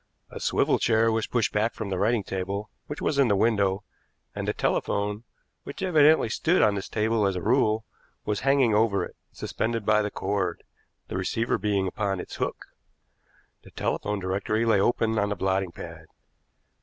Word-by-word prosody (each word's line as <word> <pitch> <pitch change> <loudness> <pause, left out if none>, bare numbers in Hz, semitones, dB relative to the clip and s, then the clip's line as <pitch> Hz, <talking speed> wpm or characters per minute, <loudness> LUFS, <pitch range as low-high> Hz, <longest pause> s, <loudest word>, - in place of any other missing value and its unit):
A - - -7
swivel - - +2
chair 115 0 +3
was 110 0 0
pushed 120 -3 0
back 110 +2 +1
from 110 -3 -5
the 95 - -1
writing 110 +1 +2
table, 95 +3 -4 0.2
which 150 - -6
was 140 - +1
in 135 - +5
the 100 - +3
window, 100 -2 +2 0.5
and - - -4
the - - +2
telephone, 105 +2 -1 0.4
which - - -7
evidently 155 -6 +5
stood 165 +10 +2
on 105 -1 +4
this 100 -1 -4
table 110 -1 +1
as 95 - -1
a 90 - -3
rule, 110 -2 +2 0.4
was 105 -1 -1
hanging 135 -4 +3
over 105 -2 +2
it, - - -13 0.2
suspended 115 -1 -3
by 105 0 +4
the 105 - -1
cord, 100 0 -2 0.4
the - - -4
receiver 115 +5 0
being 100 -1 0
upon 100 0 -2
its - - -7
hook. - - -3 1.0
The - - -15
telephone 105 0 -2
directory 100 +4 -1
lay 110 -4 +4
open 110 0 +1
on 105 0 +1
the 105 - -1
blotting 95 -1 0
pad. 85 -2 -10
105 Hz, 180 wpm, -26 LUFS, 100-115 Hz, 1.0 s, in